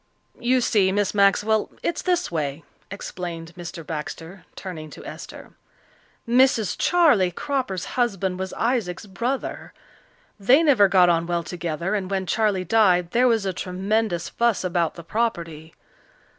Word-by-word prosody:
"You 250 +1 +2
see, 200 -5 +3
Miss 205 0 0
Maxwell, 210 +2 +3
it's 340 - -1
this 360 - 0
way," 150 -2 -3 0.3
explained 175 -4 -6
Mr. 170 -2 -8
Baxter, 165 +4 -7
turning 160 -5 -7
to - - -12
Esther. - - -9 0.8
"Mrs. 235 -7 +3
Charley 295 - +4
Cropper's 250 -3 -3
husband 195 -7 -1
was 190 0 -4
Isaac's 225 -6 -1
brother. 240 +7 -4 0.7
They 255 +11 +5
never 255 -10 +5
got 180 -1 +5
on 170 -1 +1
well 170 -1 -1
together, 170 +2 -3
and 195 -3 -2
when 190 -1 -1
Charley 205 -2 +1
died 180 -4 +3
there 250 +2 +4
was 225 -4 +2
a 190 - -1
tremendous 190 0 -1
fuss 235 -4 0
about 175 -2 0
the 170 - -9
property. 165 -6 -3
190 Hz, 140 wpm, -23 LUFS, 175-225 Hz, 0.8 s, They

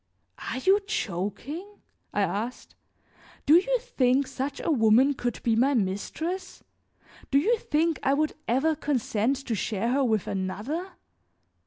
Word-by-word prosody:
"Are - - -3
you 385 +10 +4
joking?" 290 - -4 0.4
I 205 - 0
asked. 205 +6 -3 0.7
"Do 295 - +5
you 445 +9 +5
think 275 - +1
such 270 +2 -4
a - - -1
woman 245 +2 +5
could 245 -3 -3
be 230 -2 +2
my 265 +5 +3
mistress? 245 - -3 0.7
Do 275 - +3
you 440 +11 +3
think 320 - 0
I 275 - +2
would 305 +1 0
ever 270 +7 +2
consent 255 -4 0
to 235 - -2
share 220 +2 -1
her 275 +2 +2
with 220 -6 +1
another? 220 - -3
270 Hz, 140 wpm, -27 LUFS, 220-320 Hz, 0.7 s, Do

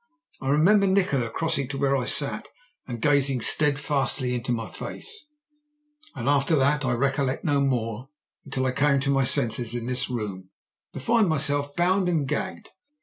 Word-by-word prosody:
I 135 - -2
remember 195 +8 +4
Nikola 180 -11 +1
crossing 140 0 -1
to 135 +1 -5
where 140 0 +1
I 130 -3 -1
sat - - -2 0.4
and 120 -2 -5
gazing 140 -3 +2
steadfastly 140 -2 +1
into 125 0 -3
my 115 -2 -2
face, 435 -8 -6 0.9
and - - -5
after 145 +2 +3
that 145 +1 +2
I 130 -2 0
recollect 135 +1 0
no 145 -3 +2
more 125 -2 -2 0.3
until 135 -2 -3
I 130 - +1
came 140 +2 +2
to 140 0 0
my 135 -1 +2
senses 120 0 0
in 120 -1 -4
this 125 +1 0
room, 100 -6 -5 0.4
to - - -6
find 220 - +2
myself 145 -1 0
bound 180 +1 +2
and 155 -5 0
gagged. 190 +7 -4
140 Hz, 165 wpm, -25 LUFS, 125-150 Hz, 0.9 s, remember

